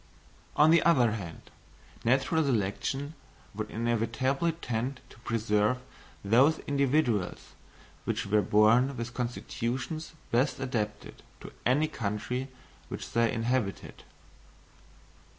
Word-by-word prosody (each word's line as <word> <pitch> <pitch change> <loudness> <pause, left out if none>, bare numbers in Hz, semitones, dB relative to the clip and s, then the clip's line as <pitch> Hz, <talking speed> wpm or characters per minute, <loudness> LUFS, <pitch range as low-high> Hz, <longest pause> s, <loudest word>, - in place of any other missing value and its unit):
On 155 +1 +6
the 170 - +6
other 125 -9 +4
hand, 95 -7 -7 0.5
natural 135 +6 +2
selection 135 +4 -1 0.4
would 105 +1 -4
inevitably 120 +7 0
tend 125 -3 -3
to - - -16
preserve 110 0 +1 0.5
those 130 +10 +5
individuals 140 - +1 0.6
which - - -1
were 105 +1 +3
born 110 +7 +4
with 115 +1 -5
constitutions 125 +5 -3 0.2
best 125 +5 +2
adapted 110 -6 -3 0.2
to - - -9 0.2
any 145 +5 +3
country 125 +3 -3 0.4
which - - -6
they 115 -1 +2
inhabited. 115 -3 -2
120 Hz, 100 wpm, -29 LUFS, 110-135 Hz, 0.6 s, On